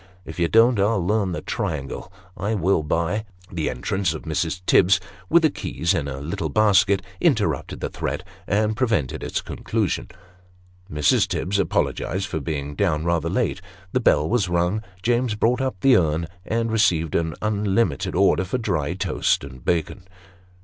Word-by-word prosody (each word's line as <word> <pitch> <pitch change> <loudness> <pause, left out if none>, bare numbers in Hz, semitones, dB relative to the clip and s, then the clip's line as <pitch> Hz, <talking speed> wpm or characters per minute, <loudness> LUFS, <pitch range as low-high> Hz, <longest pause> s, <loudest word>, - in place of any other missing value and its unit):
If - - -8
you 85 - +3
don't, 115 +3 +4
I'll 100 -2 +2
learn 100 -1 +1
the 85 - -4
triangle 70 -4 -4 0.2
I 105 +3 -2
will, 95 -2 +2
by 85 +7 -1 0.2
" 90 - -24
The 80 -3 -1
entrance 95 -4 -1
of - - -7
Mrs. 80 +3 -2
Tibbs 95 +1 +5 0.3
(with 170 +1 +5
the 155 - +4
keys 85 -8 -1
in 80 -7 -1
a 70 -1 -5
little 80 +2 -3
basket) 100 +1 +3 0.2
interrupted - - 0
the - - -2
threat, - - -4 0.2
and 105 +2 +1
prevented 110 - 0
its - - -2
conclusion. - - -2 0.8
Mrs. 75 -1 +3
Tibbs 100 +2 -1
apologized 95 0 0
for 80 - -3
being 75 -1 -4
down 75 +1 0
rather 85 -1 0
late; 100 0 -1 0.3
the 130 - +1
bell 75 -10 +3
was 105 -4 +1
rung; 90 +4 +1 0.2
James 120 -1 +1
brought 120 +5 +1
up 130 -8 -2
the 135 -1 +6
urn, 80 -1 +2 0.2
and 115 0 0
received 85 -8 +2
an 80 -2 0
unlimited 105 - 0
order 90 - +3
for 95 +7 -2
dry 85 - -1
toast 95 - 0
and 65 -2 -10
bacon. 90 +3 -1
95 Hz, 165 wpm, -23 LUFS, 80-110 Hz, 0.8 s, the